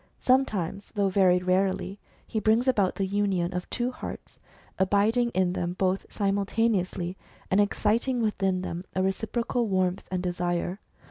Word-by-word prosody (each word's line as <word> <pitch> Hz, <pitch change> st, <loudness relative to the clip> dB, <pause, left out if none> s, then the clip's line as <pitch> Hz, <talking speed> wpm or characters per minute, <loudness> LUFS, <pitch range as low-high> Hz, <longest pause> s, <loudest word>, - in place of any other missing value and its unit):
Sometimes, 210 Hz, -8 st, 0 dB
though 200 Hz, -1 st, +2 dB
very 185 Hz, -2 st, +4 dB
rarely, 190 Hz, +2 st, 0 dB, 0.3 s
he 220 Hz, -, -2 dB
brings 220 Hz, +4 st, +2 dB
about 205 Hz, -8 st, +2 dB
the 195 Hz, -, 0 dB
union 190 Hz, -3 st, 0 dB
of 180 Hz, 0 st, -4 dB
two 245 Hz, +1 st, -1 dB
hearts, -, -, -8 dB, 0.4 s
abiding 210 Hz, +5 st, +3 dB
in 185 Hz, -1 st, +2 dB
them 175 Hz, -1 st, -2 dB
both 185 Hz, +1 st, 0 dB
simul 200 Hz, -1 st, 0 dB
taneously, 185 Hz, -5 st, 0 dB, 0.4 s
and 195 Hz, +2 st, +5 dB
exciting 225 Hz, +5 st, +1 dB
within 195 Hz, -4 st, 0 dB
them 175 Hz, 0 st, -4 dB
a 185 Hz, -, +1 dB
reciprocal 230 Hz, +5 st, -1 dB
warmth 185 Hz, -1 st, 0 dB
and 185 Hz, -1 st, -2 dB
desire. 175 Hz, +1 st, -1 dB
195 Hz, 145 wpm, -27 LUFS, 185-215 Hz, 0.4 s, and